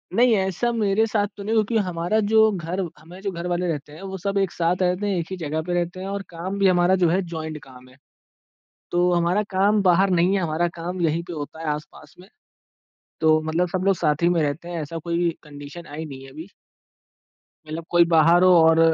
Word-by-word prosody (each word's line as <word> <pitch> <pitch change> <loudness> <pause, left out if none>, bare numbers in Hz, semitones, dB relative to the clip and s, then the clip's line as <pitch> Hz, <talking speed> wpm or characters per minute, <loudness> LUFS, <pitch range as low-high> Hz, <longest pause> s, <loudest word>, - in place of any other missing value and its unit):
नहीं, 240 +1 +5
ऐसा 190 +5 0
मेरे 220 -1 +1
साथ 210 -2 0
तो 200 - -7
नहीं 220 +3 -1
हुआ, 220 - +4
क्योंकि 220 0 0
हमारा 175 +4 -1
जो 220 0 +5
घर 180 -1 -4 0.2
हमारे 175 +5 -13
जो 195 0 -3
घर 170 -1 -5
वाले 180 0 -1
रहते 150 -3 -4
हैं, 160 - -12
वो 190 0 -6
सब 200 +2 -2
एक 195 -2 +1
साथ 170 +1 0
रहते 180 +2 +1
हैं, 200 - 0
एक 165 -1 -3
ही 190 - -4
जगह 160 -2 -3
पे 175 +2 -4
रहते 175 +1 -2
हैं 190 - -5
और 200 0 -3
काम 180 +3 -5
भी 195 - +4
हमारा 180 0 +4
जो 170 - +4
है 185 +4 +2
जॉइंट 160 -1 -5
काम 130 -1 -15
है। 130 - -20 0.9
तो 175 +1 +2
हमारा 175 +4 +2
काम 200 +2 +2
बाहर 190 +1 +4
नहीं 180 +2 +3
है, 195 - +1
हमारा 170 +1 0
काम 175 +2 -5
यहीं 165 0 +1
पे 180 - -7
होता 155 0 -7
है 165 - -5
आस-पास 150 +2 -11
में, 185 - -16 0.9
तो 155 0 +4
मतलब 160 +3 0
सब 185 +1 -2
लोग 195 0 +4
साथ 150 -2 0
ही 170 - +5
में 175 -1 +2
रहते 150 +3 -3
हैं 175 -1 -4
ऐसा 165 +3 -6
कोई 170 +1 0
कंडीशन 145 +3 -10
आई 150 +2 -7
नहीं 135 -3 -9
है 135 - -12
अभी। 160 +7 -10 1.2
मतलब 160 +2 -6
कोई 175 0 +5
बाहर 165 +3 +5
हो 185 0 +6
और 160 0 +5
175 Hz, 230 wpm, -23 LUFS, 160-190 Hz, 1.2 s, हो